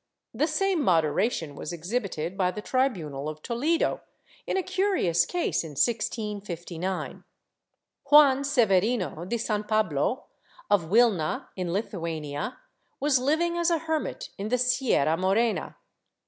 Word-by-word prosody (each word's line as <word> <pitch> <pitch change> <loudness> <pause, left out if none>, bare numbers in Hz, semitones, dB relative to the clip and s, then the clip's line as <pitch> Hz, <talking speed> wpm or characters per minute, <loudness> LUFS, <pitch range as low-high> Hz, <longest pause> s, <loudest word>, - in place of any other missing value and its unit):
^ - - -11
The 305 - +3
same 365 +2 +1
moderation 165 - +1
was 150 - -6
exhibited 175 -1 -3
by 185 -2 +1
the 195 - -5
tribunal 160 - -1
of 155 0 -9
Toledo, 290 +8 0 0.5
in - - 0
a 380 - 0
curious 370 - +1
case, 355 - -1
in 160 -2 -8
1659. 190 - -2 0.9
Juan 280 -2 +7
Severino 220 - +1
de 235 +6 -2
San 215 -2 -1
Pablo, 215 - 0 0.5
of 175 -6 +2
Wilna 205 -7 +2
in 180 -2 -3
Lithuania, 165 - -3 0.4
was 280 -2 +3
living 330 +6 +1
as 340 0 +2
a 335 - +2
hermit 320 -1 -3
in 200 - -3
the 250 - +2
Sierra 250 - +2
Morena. 200 +5 0
210 Hz, 130 wpm, -27 LUFS, 170-270 Hz, 0.9 s, Juan